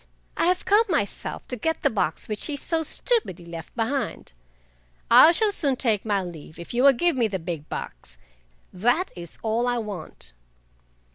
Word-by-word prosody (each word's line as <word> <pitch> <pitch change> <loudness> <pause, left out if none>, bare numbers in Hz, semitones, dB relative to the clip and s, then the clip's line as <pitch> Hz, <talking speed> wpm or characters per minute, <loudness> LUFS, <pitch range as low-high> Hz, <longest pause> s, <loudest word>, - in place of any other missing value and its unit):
I - - +2
have 365 0 +1
come 420 +3 +5
myself 290 - -2
to 250 - -2
get 320 +8 -2
the - - +3
box 195 -7 -1
which 215 -1 -3
he 295 -2 -3
so 325 +3 -1
stupidly 315 - 0
left 165 -2 -9
behind. 235 - -2 0.8
I 325 - +9
shall 420 +4 +2
soon 285 -9 0
take 225 -6 0
my 200 -3 +1
leave 160 -3 -10
if 170 - -8
you 240 - +1
will 275 +1 +7
give 345 +5 +2
me 240 -3 +2
the 195 -2 -3
big 165 -3 -6
box—that 60 - -4
is 170 -2 -8
all 230 +2 +1
I 245 0 +1
want!" 195 - -6
225 Hz, 170 wpm, -25 LUFS, 170-285 Hz, 0.8 s, I